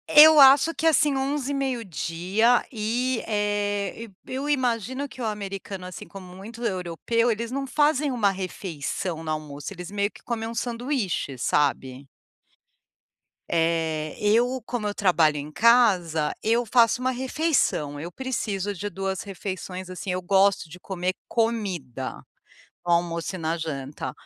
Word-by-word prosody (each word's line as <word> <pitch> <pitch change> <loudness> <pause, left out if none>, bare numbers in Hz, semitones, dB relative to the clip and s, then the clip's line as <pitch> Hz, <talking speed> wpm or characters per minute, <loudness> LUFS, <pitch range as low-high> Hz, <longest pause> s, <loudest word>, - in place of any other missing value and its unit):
Eu 310 0 +10
acho 275 +4 +7
que 325 - 0
assim 300 -3 +4
11h, 275 +1 -1
meio 265 -4 -2
dia 190 +8 +1
e, 240 +2 -1
eh, 205 0 -1 0.2
e - - -12
e - - -3
eu 275 +3 -3
imagino 260 0 0
que 265 -2 -11
o - - -1
americano, 195 -3 -5
assim, 180 - -8
como 185 -2 -11
muito 220 +5 -9
europeu 190 +4 0
eles 230 +2 -3
não 275 +1 -3
fazem 295 +1 +2
uma 220 -6 +2
refeição 180 -2 -4
no 160 - -5
almoço, 150 -1 -5
eles 180 -1 -8
meio 205 0 0
que - - -18
comem 225 -2 -3
um 230 - -7
sanduíche, 235 - -2
sabe. 135 0 0 1.4
Eh, 160 -2 0
eu 240 +5 +2
como 235 -2 -4
eu 205 - -2
trabalho 170 -7 +3
em 145 +1 -6
casa, 180 -9 +4
eu 230 +2 +2
faço 235 +1 +4
uma 255 - +1
refeição, 260 - 0
eu 170 +4 -6
preciso 205 -5 -3
de 205 +3 -5
2 195 -1 -3
refeições, 185 -2 -6
assim, 185 +1 -5
eu 180 0 -2
gosto 195 -2 +3
de 180 +4 -11
comer 185 0 -3
comida, 190 - -2 0.6
no 175 - +1
almoço 170 +1 0
e - - -7
na 165 0 -1
janta. 140 -5 -5
200 Hz, 150 wpm, -25 LUFS, 175-245 Hz, 1.4 s, Eu